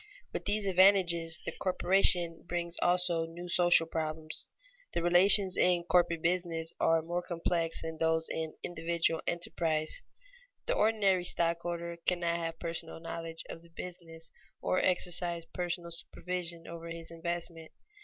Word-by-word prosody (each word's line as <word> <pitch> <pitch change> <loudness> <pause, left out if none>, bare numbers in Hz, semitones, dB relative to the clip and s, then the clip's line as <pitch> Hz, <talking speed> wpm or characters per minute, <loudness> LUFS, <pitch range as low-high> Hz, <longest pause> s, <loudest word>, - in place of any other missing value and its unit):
With - - -4
these 205 0 0
advantages 180 -4 +4
the - - -2
corporation 180 -2 +3
brings 170 -1 -2
also 175 -2 +2
new 170 +2 -9
social 175 -1 +4
problems. 155 -1 -2 0.4
The 170 - -1
relations 185 +2 +5
in 175 -1 +2
corporate 170 -2 +2
business 165 -2 -1
are 165 0 +3
more 175 +2 -2
complex 170 -1 -1
than 160 -1 -6
those 160 0 +1
in 160 -1 -4
individual 165 -1 -1
enterprise. 165 - 0 0.6
The - - +1
ordinary 205 - +2
stockholder 170 0 -1
cannot 170 -1 +2
have 165 -1 -4
personal 165 -1 -5
knowledge 165 0 -6
of 165 - -9
the 170 - -19
business 165 -1 -9 0.3
or 185 - 0
exercise 175 -2 0
personal 175 0 -4
supervision 170 0 -5
over 170 0 -8
his 165 0 -7
investment. 170 -1 -5
170 Hz, 135 wpm, -31 LUFS, 165-180 Hz, 0.6 s, relations